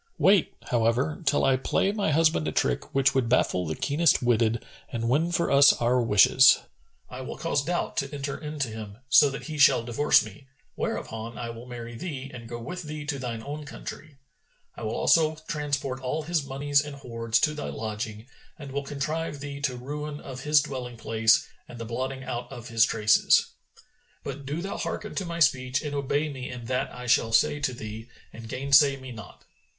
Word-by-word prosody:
Wait, 195 -2 +3 0.2
however, 125 +8 +1
till 145 - +3
I 135 -1 +4
play 190 +8 +1
my 205 -4 -1
husband 155 - +2
a - - -1
trick 65 - -1
which 135 0 +4
would 130 -4 +1
baffle 90 -7 +2
the 80 - -2
keenest 150 +2 +2
witted 115 -1 +1 0.3
and 115 -1 -2
win 160 +7 +2
for 170 0 0
us 140 0 +7
our 125 +1 +1
wishes. 115 +4 +6 0.5
I 130 +1 -8
will 130 - -7
cause 155 -4 0
doubt 175 +3 -2
to 140 0 -1
enter 140 -1 -4
into 150 -3 -4
him, 110 -2 -8
so 145 0 +7
that 135 - -6
he 155 -2 -6
shall 140 -4 +6
divorce 120 +5 +3
me, 140 -2 -13 0.3
whereupon 115 +1 -4
I 115 -1 -4
will 115 +2 -10
marry 120 -1 -7
thee 135 +1 -6
and 115 -2 -9
go 120 0 -5
with 180 +10 -6
thee 150 -2 -7
to 145 -2 -3
thine 115 -3 -5
own 150 +2 -6
country; 145 0 -9 0.6
I - - -10
will 110 0 -3
also 160 -1 +3
transport 140 -4 -2
all 150 +5 -2
his 165 -1 0
monies 140 +1 +1
and 145 -1 -7
hoards 115 -4 -1
to 150 - +2
thy 150 - -5
lodging 110 0 -5 0.3
and 145 -4 -9
will 140 +1 -2
contrive 145 +2 -3
thee 140 0 -6
the 135 -3 -2
ruin 150 +3 -5
of 130 -2 -8
his 150 0 +4
dwelling 125 -4 -6
place 115 0 +2 0.2
and 120 - -10
the 115 - -5
blotting 130 +3 -4
out 120 -1 -5
of 120 0 -9
his 115 -1 +4
traces. 110 0 +3 0.7
But 140 0 -7
do 155 +5 -3
thou 195 - -4
hearken 210 - -4
to 190 - -3
my 170 0 -5
speech 135 -2 +2
and 150 -1 -4
obey 145 +2 0
me 130 -4 -6
in 125 -2 -7
that 130 +2 -1
I 125 0 -8
shall 115 -2 +3
say 130 +6 +3
to 135 -3 0
thee 110 0 -8 0.2
and 115 -1 -10
gainsay 140 +2 +4
me 130 -1 -9
not." 110 -6 -11
135 Hz, 195 wpm, -26 LUFS, 120-145 Hz, 0.7 s, us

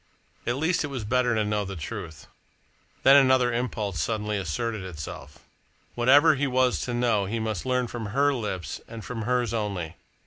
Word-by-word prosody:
At 120 - +1
least 160 +5 +1
it - - -2
was 135 -5 -5
better 120 +2 +1
to 110 -1 +1
know 105 0 0
the 100 0 -6
truth! 80 -1 -7 0.8
Then 135 - +8
another 130 -3 +4
impulse 110 - -2
suddenly 105 +2 -1
asserted 100 +4 -2
itself. 85 -6 -8 0.5
Whatever 145 +6 +6
he 145 0 0
was 130 -1 +2
to 125 - -3
know 115 -4 +2
he 110 +4 -2
must 110 -1 -3
learn 125 -1 +1
from 120 -2 -5
her 140 +7 +2
lips 95 - -4
and 115 -1 -9
from 120 -2 -5
hers 125 -2 +1
only. 100 -7 -3
115 Hz, 175 wpm, -26 LUFS, 105-125 Hz, 0.8 s, Then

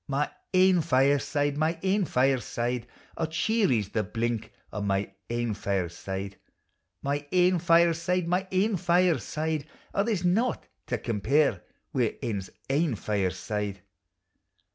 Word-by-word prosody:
My 145 +1 0 0.2
ain 185 -2 +5
fireside, 145 0 +2
iny 160 +2 +1
ain 195 +1 +2
fireside, 125 -3 0 0.3
O, 160 - 0
cheery 160 - +2
's 100 - -11
the 110 - 0
blink 115 +2 -2 0.2
o' 105 - -3
my 100 -1 -1 0.2
ain 120 -1 -1
fireside; 95 0 -3 0.7
My 145 +1 -2
ain 180 0 +4
fireside, 170 +1 +3
my 180 +2 0
ain 195 +2 +2
fireside, 160 -3 +1 0.3
O, - - +2
there 220 +1 +1
's 175 - -4
naught 215 +8 +1 0.2
to - - 0
compare 115 - +1 0.3
wi' - - 0
ane's 100 -4 -3 0.2
ain 145 -1 +1
fireside. 100 0 -2
145 Hz, 125 wpm, -28 LUFS, 110-175 Hz, 0.7 s, ain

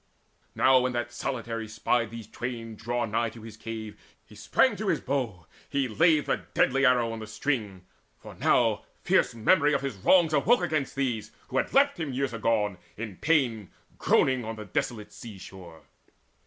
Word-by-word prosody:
Now 130 0 +5
when 125 0 -1
that 120 0 -3
solitary 115 -3 -4
spied 115 +1 0
these 115 0 -8
twain 115 0 -6
Draw 120 +3 -2
nigh 115 +1 0
his 110 -1 -11
cave, 110 -2 -7 0.3
he - - -18
sprang - - +2
to - - -4
his - - +2
bow, 120 - -3 0.2
he 140 -2 0
laid 155 +5 +3
The - - -1
deadly 135 +1 +3
arrow 120 -2 +3
on 115 - -5
the 110 - -7
string; 105 -6 -3 0.3
for - - -12
now - - +2 0.2
Fierce - - +2
memory 150 +6 +3
of - - 0
his 135 -7 -4
wrongs 165 - +4
awoke 180 - +3
against 155 -5 -1
These, 125 -6 -2 0.2
who 130 - -2
had - - 0
left 280 -5 +3
him 150 -5 -3
years 135 -1 -1
agone, 105 -4 0 0.2
in 110 -4 -6
pain 125 - +1 0.3
Groaning 130 -1 +3
upon 115 -1 -5
the 110 -1 -8
desolate 105 +2 -3
sea 110 -4 -10
shore. 90 -3 -12
115 Hz, 175 wpm, -27 LUFS, 110-135 Hz, 0.3 s, Now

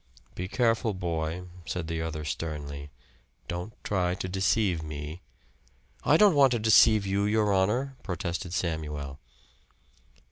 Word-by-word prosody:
"Be 90 - -4
careful, 115 -1 +1
boy," 85 -1 -2 0.2
said 90 +2 -3
the 80 0 -2
other 80 -2 -4
sternly. 75 -2 -5 0.6
"Don't 90 +5 -4
try 90 -3 0
to 95 - -4
deceive 95 -1 +1
me." 75 +2 -6 0.8
"I 150 - +5
don't 205 -1 +6
want 140 -2 +6
to - - +2
deceive 110 -1 +5
you, 100 +1 +1
your 105 -1 +2
honor," 120 +9 +1
protested 90 -2 -4
Samuel. 75 -5 -3
90 Hz, 130 wpm, -28 LUFS, 80-105 Hz, 0.8 s, don't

